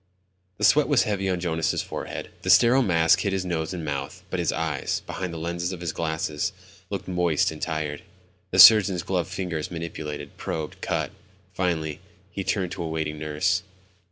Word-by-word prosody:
The - - -6
sweat 150 0 +5
was 145 -4 +4
heavy 100 -3 -1
on 90 -1 0
Jonas' 80 -2 0
forehead. - - -6
The - - -4
sterile 125 +3 +6
mask 85 -7 +4
hid 100 -2 -1
his 95 -1 -1
nose 80 -3 -2
and 85 -4 -5
mouth, 70 -2 -4
but 95 - -1
his 85 - +1
eyes, 80 -3 -2
behind 95 -2 -4
the 85 - -6
lenses 85 +2 -3
of 90 - -6
his 85 -3 -3
glasses, 80 +1 -2 0.4
looked 95 -2 -5
moist 90 -5 +1
and 75 - -9
tired. 80 -1 -3 0.5
The 95 - -2
surgeon's 95 -3 +8
gloved 90 -4 -1
fingers 85 -5 -3
manipulated, 80 -3 -6
probed, 80 -2 -5
cut. - - -1 0.4
Finally, 80 -5 -1 0.3
he 95 - -4
turned 95 -2 -1
to 95 - -5
a - - -3
waiting 80 -1 -3
nurse. 75 +5 0
85 Hz, 180 wpm, -25 LUFS, 80-95 Hz, 0.5 s, surgeon's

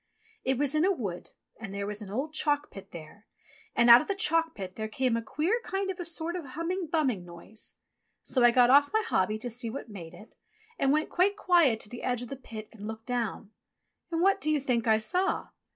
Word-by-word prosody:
It 265 -1 +1
was 285 +1 0
in 310 +1 +2
a 385 - +4
wood, 200 - -4 0.3
and 220 -3 -7
there 200 0 -3
was 210 +1 -4
an 205 - -8
old 270 +9 -3
chalk 295 -1 0
pit 195 - -11
there, 170 +6 -12 0.5
and 235 0 +4
out 235 +1 +10
of - - -7
the 395 - -1
chalk 330 -5 +2
pit 190 -2 -7
there 220 0 -3
came 245 +2 0
a 230 - -1
queer 325 - -1
kind 385 0 -2
of 370 - -9
a - - -2
sort 335 0 -1
of 355 - -4
a - - -11
humming, 335 +6 -3
bumming 275 - 0
noise. 175 +5 -11 0.5
So 255 - +1
I 240 - +8
got 245 +1 +5
off 285 +1 +6
my 440 +1 +2
hobby 215 - +1
to 245 +3 -6
see 235 0 -2
what 235 0 -7
made 175 -6 -9
it, 215 - -15 0.5
and 275 - +3
went 305 +2 +1
quite 395 +3 +2
quiet 335 - +4
to 210 - -6
the 240 - -8
edge 245 -1 -1
of 245 - -8
the 275 - -5
pit 220 -5 -9
and 210 -2 -9
looked 220 0 -7
down. 230 -4 -3 0.6
And 335 0 0
what 390 +1 +3
do 310 - -1
you 305 -1 +2
think 245 -4 -1
I 220 -1 +5
saw 360 - -1
255 Hz, 240 wpm, -29 LUFS, 220-325 Hz, 0.6 s, out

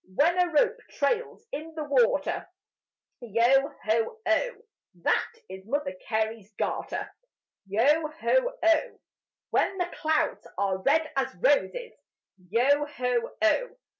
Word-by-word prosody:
When 340 - +3
a 355 -1 +2
rope 300 - +3
trails 455 +12 -1
in 315 +3 -6
the 310 - -3
water, 475 +12 +1 0.7
Yo 240 +5 +3 0.2
ho 225 - +1
oh! 330 +10 +2 0.5
That - - +2 0.2
is 190 +1 -10
Mother 285 -3 -1
Carey's 220 -1 -2
garter: - - -2 0.6
Yo 285 +11 +3
ho - - +1
oh! 330 -1 +2 0.5
When 385 - +1
the 355 -1 -2
clouds 315 -1 0
are 195 -1 0
red 315 +11 +2
as 270 -7 -1
roses, 460 - +1 0.6
Yo 270 +7 +3
ho 250 -4 -1
oh! 410 +12 +2
290 Hz, 120 wpm, -27 LUFS, 230-330 Hz, 0.7 s, When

